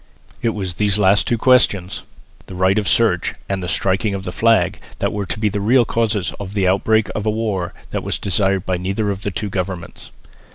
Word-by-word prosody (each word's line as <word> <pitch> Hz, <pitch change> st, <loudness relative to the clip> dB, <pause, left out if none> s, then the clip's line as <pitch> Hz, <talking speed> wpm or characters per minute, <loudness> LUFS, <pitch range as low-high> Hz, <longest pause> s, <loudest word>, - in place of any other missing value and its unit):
It 115 Hz, -1 st, 0 dB
was 95 Hz, -4 st, -3 dB
these 105 Hz, +2 st, +1 dB
last 100 Hz, 0 st, +3 dB
two 120 Hz, -, +1 dB
questions, 110 Hz, -7 st, +3 dB, 0.5 s
the 95 Hz, -, -9 dB
right 95 Hz, +3 st, +3 dB
of 105 Hz, -, -3 dB
search -, -, +2 dB
and 95 Hz, -1 st, -2 dB
the 90 Hz, -, -4 dB
striking 95 Hz, +3 st, 0 dB
of 95 Hz, -, -5 dB
the 90 Hz, -, -4 dB
flag, 100 Hz, -3 st, +2 dB, 0.2 s
that -, -, -1 dB
were 100 Hz, -2 st, -3 dB
to -, -, -3 dB
be 110 Hz, -, +1 dB
the 105 Hz, 0 st, -1 dB
real 120 Hz, +4 st, +4 dB
causes 110 Hz, -4 st, 0 dB
of 100 Hz, 0 st, -7 dB
the 95 Hz, -2 st, +2 dB
outbreak 105 Hz, +3 st, +2 dB
of 105 Hz, +1 st, -3 dB
a -, -, +4 dB
war 105 Hz, -5 st, -2 dB, 0.2 s
that -, -, -2 dB
was -, -, -2 dB
desired 95 Hz, 0 st, 0 dB
by 90 Hz, -1 st, 0 dB
neither 100 Hz, +4 st, -1 dB
of 100 Hz, 0 st, -5 dB
the 100 Hz, -, -2 dB
two 100 Hz, +1 st, -4 dB
governments. 90 Hz, -2 st, -5 dB
100 Hz, 215 wpm, -19 LUFS, 95-110 Hz, 0.5 s, real